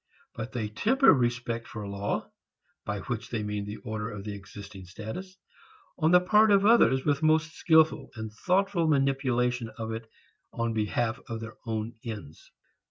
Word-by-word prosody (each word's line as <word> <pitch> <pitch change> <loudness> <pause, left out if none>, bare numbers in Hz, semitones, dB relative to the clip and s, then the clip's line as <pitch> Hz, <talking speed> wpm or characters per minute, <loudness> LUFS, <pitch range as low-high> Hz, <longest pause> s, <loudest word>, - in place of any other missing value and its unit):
But 115 +2 -6
they 115 -4 -2
temper 245 - +4
respect 120 -2 -1
for 105 -3 -6
law 100 0 -3 0.5
by 100 -1 -3
which 120 +1 -4
they 110 -3 -2
mean 105 -1 -3
the 105 - -5
order 110 -1 -3
of 105 -3 -7
the 105 0 -5
existing 100 -1 -10
status 110 - -8 0.6
on 160 -1 +3
the 180 +1 +7
part 210 +4 +4
of 200 -1 +5
others 205 - +5
with 145 0 +1
most 155 0 +3
skilful 160 -4 +3
and 110 -1 -6 0.2
thoughtful 185 -2 +2
manipulation 130 -4 +1
of 115 -1 -4
it 110 0 -6 0.5
in 115 -1 0
behalf 110 +2 -1
of 115 -1 -3
their 115 0 -8
own 110 +1 -2
ends. 105 -10 -8
120 Hz, 165 wpm, -28 LUFS, 110-155 Hz, 0.6 s, the